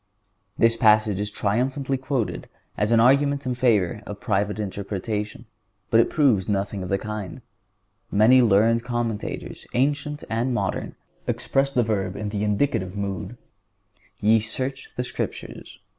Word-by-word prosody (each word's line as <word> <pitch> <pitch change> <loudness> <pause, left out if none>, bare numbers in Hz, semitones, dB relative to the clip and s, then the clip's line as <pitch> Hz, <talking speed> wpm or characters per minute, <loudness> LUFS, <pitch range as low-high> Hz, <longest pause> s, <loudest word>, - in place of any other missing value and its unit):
(138) 115 - +5
This 115 0 -1
passage 105 -2 +4
is 105 0 -2
triumphantly 130 +7 -1
quoted 130 -3 -3 0.3
as 105 +3 0
an 115 - +5
argument 140 +3 +3
in 125 - 0
favor 110 -5 +2
of 105 -1 -7
private 105 -2 0
interpretation. 105 +2 -4 0.5
But 115 - +6
it - - +4
proves 125 - +2
nothing 100 0 -1
of 90 - -5
the 100 - +2
kind. 105 -3 -6 0.7
Many 115 +5 +6
learned 115 +1 +4
commentators, 120 -3 -4
ancient 145 +3 0
and 120 +3 -1
modern, - - -2 0.3
express 135 0 +1
the 125 -3 +2
verb 100 -4 -1
in 105 0 -4
the 100 0 -2
indicative 105 -3 0
mood: 100 +4 -4 0.8
"Ye 110 +2 +4
search 130 +5 -4
the 125 - 0
Scriptures." - - -6
110 Hz, 145 wpm, -24 LUFS, 105-125 Hz, 0.8 s, But